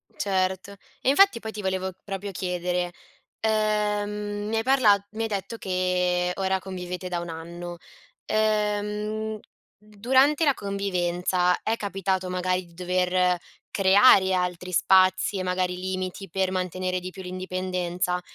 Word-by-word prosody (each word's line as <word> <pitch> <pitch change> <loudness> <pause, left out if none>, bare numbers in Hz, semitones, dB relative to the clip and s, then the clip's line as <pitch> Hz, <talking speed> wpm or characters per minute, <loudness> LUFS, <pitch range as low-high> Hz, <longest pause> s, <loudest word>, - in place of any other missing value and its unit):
Certo. 190 0 -1 0.3
E 260 - +2
infatti 390 -3 +5
poi 220 0 -6
ti 210 - -6
volevo 190 0 -1
proprio 200 0 -5
chiedere, 180 -1 -2 0.5
ehm 210 -1 0
mi 225 - -1
hai 225 - 0
parla 255 -6 +5 0.2
mi 225 +1 -3
hai - - 0
detto 215 +2 -4
che 180 -1 0
ora 190 -1 0
convivete 180 -1 -6
da 175 -1 -2
1 170 0 -6
anno. 170 +2 -7 0.5
Ehm, 215 0 -1 0.4
durante 260 +9 +2
la 280 - +4
convivenza 180 -3 0
è 225 - 0
capitato 190 -2 -2
magari 180 0 -1
di 170 - -20
dover 180 0 +1 0.3
creare 195 0 +6
altri 180 0 -2
spazi 185 +2 +3
e 185 - -2
magari 180 0 0
limiti 185 0 -4
per 190 +1 0
mantenere 185 0 -2
di 180 +1 -6
più 190 - -10
l'indipendenza? 180 -1 -2
185 Hz, 135 wpm, -25 LUFS, 180-210 Hz, 0.5 s, creare